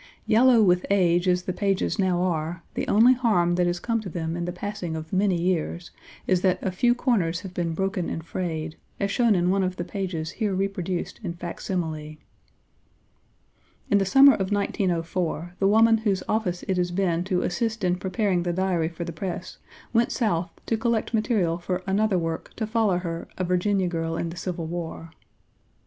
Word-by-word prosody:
Yellow 235 0 +5
with 180 -2 +3
age 180 -2 +3
as 180 0 +2
the 185 - -3
pages 195 +1 0
now 180 -2 +2
are, 170 -1 -2
the - - -3
only 230 +5 +6
harm 210 -9 +2
that 175 0 +2
has 175 0 -1
come 230 +3 -1
to 200 - -6
them 165 -1 -3
in 170 0 -3
the 175 - -3
passing 180 -2 -5
of 160 +2 -7
many 190 -2 +2
years, 175 0 -1 0.3
is 185 -2 +2
that 185 -1 +3
a 190 - 0
few 240 +6 +2
corners 185 -10 0
have 190 -2 -8
been 170 -2 -2
broken 190 -1 -1
and 160 - -4
frayed, 160 -3 -4 0.2
as 200 0 0
shown 235 -2 +3
in 180 0 +2
one 195 +1 +2
of 185 -1 -1
the 175 - -3
pages 175 -4 -4
here 210 -3 -1
reproduced 190 -2 -2
in 180 -6 -4
facsimile. 160 -3 -4 1.7
In 200 - +5
the - - +2
summer 275 +6 +8
of 190 0 -2
1904, 175 -4 -1
the 195 - +3
woman 225 +2 +5
whose 200 -4 0
office 185 -5 -1
it 190 - -1
has 175 0 +1
been 175 -2 0
to 185 -2 0
assist 220 +4 -2
in 180 0 +2
preparing 185 0 0
the 175 0 -1
Diary 175 -3 0
for 170 0 -6
the 170 0 -6
press, 180 +2 -5 0.3
went 230 0 +3
South 180 -8 0 0.2
to 225 - 0
collect 230 0 -1
material 205 -7 +1
for 180 +1 -3
another 200 0 +2
work 165 -1 -3
to 220 - -2
follow 215 -4 +1
her 170 -2 -4
A 185 - -1
Virginia 180 +2 +1
Girl 165 -1 -2
in 170 - -2
the 165 - -7
Civil 175 -1 -4
War. 165 -1 -6
180 Hz, 190 wpm, -25 LUFS, 170-200 Hz, 1.7 s, summer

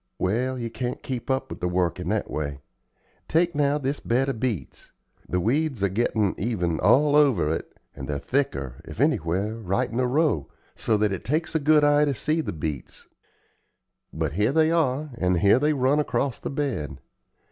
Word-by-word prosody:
Well, 125 +7 0
you 115 -2 -4
can't 120 +2 -4
keep 130 -2 -5
up 130 0 -1
with - - -6
the 90 - -1
work 90 -2 0
in - - -4
that - - 0
way. 70 -2 -4 0.7
Take 170 +2 +2
now 145 0 +2
this 140 0 -2
bed 130 +4 0
of 130 - -3
beets; 110 - -4 0.4
the 90 - 0
weeds 130 - 0
are 100 - +3
gettin' 105 -1 +1
even 90 -7 -1
all 145 +9 +4
over 135 - +4
it, - - -6 0.2
and 65 -1 -7
they're 75 - -2
thicker, 70 - -2
if - - -10
anywhere, 95 +7 +1
right 100 -3 -1
in 115 - -4
the 125 0 +2
row, 140 - +1 0.3
so 110 - +1
that 105 -1 +1
it 95 - -5
takes 155 +5 -1
a 160 - +2
good 150 +1 +4
eye 145 0 +5
to 140 -2 0
see 155 +8 0
the - - -4
beets. 75 -4 -6 1.1
But 80 -2 -2
here 105 +7 +2
they 160 +2 +3
are, 150 -3 0
and 90 -1 +2
here 100 +7 +5
they 150 +2 +2
run 140 +1 +2
across 140 -3 -1
the - - -5
bed. 130 - -3
120 Hz, 190 wpm, -25 LUFS, 90-145 Hz, 1.1 s, eye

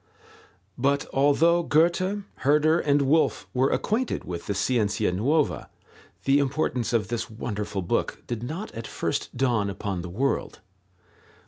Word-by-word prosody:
But 140 +2 +1
although 155 +5 +4
Goethe, 175 +6 +2
Herder, 150 +4 +3
and 145 -2 +2
Wolf 155 +4 +2
were 130 +2 +2
acquainted 235 +4 -1
with 85 -2 -6
the 100 - -1
Scienza 105 -1 +1
nuova, 140 - 0 0.5
the 135 +1 +4
importance 135 -4 0
of 110 -5 0
this 120 0 -3
wonderful 105 -3 -4
book - - -1
did 120 -2 -4
not 160 - -5
at 115 0 -7
first - - -3
dawn 120 -6 +1
upon 95 -2 -4
the 90 - -7
world. 130 +10 -1
135 Hz, 135 wpm, -26 LUFS, 105-155 Hz, 0.5 s, although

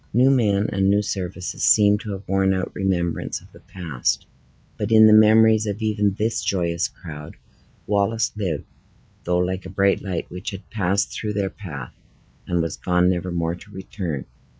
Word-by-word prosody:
New 130 +4 +5
men 105 -6 +2
and 95 -1 +2
new 100 +1 +3
services 90 -2 -4
seemed 105 -1 +5
to 105 -1 -5
have 95 +1 -8
worn 95 0 +2
out 95 - -3
remembrance 90 -3 -1
of - - -20
the - - -16
past; 80 -10 -3 0.5
but 105 +1 -3
in 110 -1 +8
the 110 - +7
memories 110 0 +6
of 100 0 -3
even 105 -3 0
this 110 +3 -1
joyous 85 -3 0
crowd, 75 -4 -10 0.5
Wallace 105 +2 +1
lived, 90 -9 -3 0.6
though 90 0 +1
like 90 +1 -1
a - - -9
bright 100 +1 +2
light 95 -4 -4
which 90 +1 -5
had 100 -1 -9
passed 100 -1 0
through 105 -1 -3
their 100 -2 -1
path, 75 -11 -8 0.5
and 85 -1 +1
was 80 - -4
gone 90 0 +2
never 90 0 -3
more 85 -1 -1
to 90 - -12
return. 90 - -5
95 Hz, 175 wpm, -22 LUFS, 90-105 Hz, 0.6 s, in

